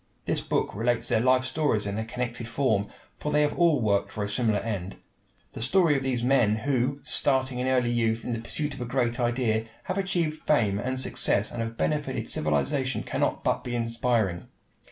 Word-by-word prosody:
This -, -, 0 dB
book -, -, -1 dB
relates 115 Hz, +2 st, 0 dB
their -, -, +3 dB
life 130 Hz, +1 st, +3 dB
stories 130 Hz, -6 st, 0 dB
in 100 Hz, +1 st, -3 dB
a -, -, -1 dB
connected 120 Hz, 0 st, -4 dB
form, 110 Hz, -6 st, 0 dB, 0.3 s
for 150 Hz, -, -3 dB
they 150 Hz, -, +3 dB
have 145 Hz, -, +1 dB
all 170 Hz, -5 st, +3 dB
worked 100 Hz, -3 st, +1 dB
for 105 Hz, -, -3 dB
a 100 Hz, -, -3 dB
similar 110 Hz, -1 st, +1 dB
end. 100 Hz, -4 st, -4 dB, 0.6 s
The -, -, -7 dB
story 165 Hz, +4 st, +3 dB
of 135 Hz, -, 0 dB
these 130 Hz, -3 st, -1 dB
men, 120 Hz, -5 st, +3 dB
who, 130 Hz, +3 st, 0 dB
starting 130 Hz, -2 st, +3 dB
in 125 Hz, -, -1 dB
early 125 Hz, -2 st, +2 dB
youth 115 Hz, -1 st, 0 dB
in 120 Hz, -, -2 dB
the 115 Hz, -, -3 dB
pursuit 145 Hz, +6 st, -3 dB
of 135 Hz, -, -9 dB
a -, -, -2 dB
great 120 Hz, 0 st, -1 dB
idea, 120 Hz, -2 st, 0 dB, 0.2 s
have 190 Hz, 0 st, -2 dB
achieved 170 Hz, -5 st, -1 dB
fame 105 Hz, -9 st, +2 dB
and 130 Hz, +3 st, -2 dB
success 105 Hz, -4 st, +1 dB
and 120 Hz, -, -4 dB
have 115 Hz, 0 st, -4 dB
benefited 80 Hz, 0 st, -1 dB
civilization, 130 Hz, -, 0 dB
cannot -, -, -1 dB
but -, -, 0 dB
be 120 Hz, -1 st, -4 dB
inspiring. 115 Hz, -5 st, 0 dB
120 Hz, 195 wpm, -27 LUFS, 110-135 Hz, 0.6 s, their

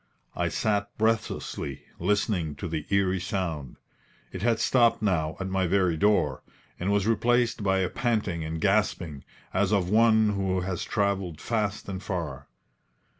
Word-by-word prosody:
I -, -, 0 dB
sat 100 Hz, -2 st, 0 dB
breathlessly, 110 Hz, -, -1 dB, 0.2 s
listening 90 Hz, -4 st, 0 dB
to 90 Hz, -, -5 dB
the 80 Hz, -2 st, -4 dB
eerie 95 Hz, -1 st, +2 dB
sound. 85 Hz, -7 st, -3 dB, 0.6 s
It 95 Hz, -, -6 dB
had 115 Hz, 0 st, +2 dB
stopped 120 Hz, -3 st, +3 dB
now 80 Hz, -6 st, 0 dB
at 95 Hz, -, -3 dB
my 95 Hz, -1 st, 0 dB
very 90 Hz, -2 st, +2 dB
door, 85 Hz, -7 st, +2 dB, 0.4 s
and 95 Hz, +3 st, 0 dB
was 100 Hz, -1 st, +2 dB
replaced 120 Hz, +1 st, +2 dB
by 95 Hz, -1 st, +2 dB
a 90 Hz, -, +1 dB
panting 110 Hz, -9 st, -1 dB
and 80 Hz, +1 st, -4 dB
gasping, 95 Hz, -7 st, 0 dB, 0.3 s
as 95 Hz, 0 st, +2 dB
of 95 Hz, -3 st, +1 dB
one 110 Hz, -1 st, +5 dB
who 95 Hz, -2 st, 0 dB
has 90 Hz, -1 st, -3 dB
travelled 100 Hz, -6 st, -1 dB
fast 105 Hz, -1 st, -2 dB
and 95 Hz, -2 st, -5 dB
far. 85 Hz, -9 st, -4 dB
95 Hz, 150 wpm, -27 LUFS, 85-105 Hz, 0.6 s, one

